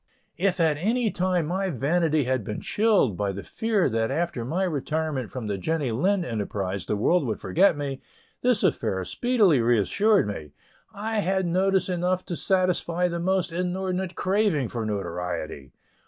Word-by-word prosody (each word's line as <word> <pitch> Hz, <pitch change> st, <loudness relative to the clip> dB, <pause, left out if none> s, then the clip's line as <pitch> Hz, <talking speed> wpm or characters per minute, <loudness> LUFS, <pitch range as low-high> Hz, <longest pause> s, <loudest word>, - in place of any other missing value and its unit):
If 190 Hz, -1 st, +1 dB
at 160 Hz, -3 st, +3 dB
any 225 Hz, +6 st, +1 dB
time 180 Hz, -2 st, 0 dB
my 190 Hz, +4 st, -1 dB
vanity 155 Hz, +2 st, +1 dB
had 130 Hz, -2 st, -1 dB
been 105 Hz, +1 st, -4 dB
chilled 205 Hz, -, +2 dB
by 100 Hz, +1 st, -1 dB
the 100 Hz, +1 st, -7 dB
fear 220 Hz, -4 st, 0 dB
that 115 Hz, -2 st, 0 dB
after 155 Hz, -3 st, -2 dB
my 165 Hz, +10 st, -1 dB
retirement 155 Hz, -, -2 dB
from 125 Hz, -4 st, -6 dB
the 100 Hz, -2 st, -2 dB
Jenny 150 Hz, -, -1 dB
Lind 180 Hz, -, +1 dB
enterprise 100 Hz, -4 st, -3 dB
the -, -, 0 dB
world 170 Hz, -, +2 dB
would 110 Hz, -, -2 dB
forget 185 Hz, -2 st, +3 dB
me, 140 Hz, -2 st, -4 dB, 0.4 s
this 245 Hz, -4 st, +2 dB
affair 110 Hz, -, 0 dB
speedily 210 Hz, -, +3 dB
reassured 120 Hz, -, +3 dB
me; 75 Hz, -8 st, -6 dB, 0.4 s
I 215 Hz, +2 st, -2 dB
had 190 Hz, -1 st, 0 dB
notice 190 Hz, +2 st, +2 dB
enough 180 Hz, 0 st, -1 dB
to 175 Hz, -, -3 dB
satisfy 180 Hz, -1 st, +1 dB
the 170 Hz, 0 st, -3 dB
most 185 Hz, 0 st, 0 dB
inordinate 180 Hz, +1 st, -2 dB
craving 185 Hz, -, +1 dB
for 115 Hz, -3 st, -3 dB
notoriety. 90 Hz, -8 st, -4 dB
170 Hz, 160 wpm, -25 LUFS, 115-190 Hz, 0.4 s, at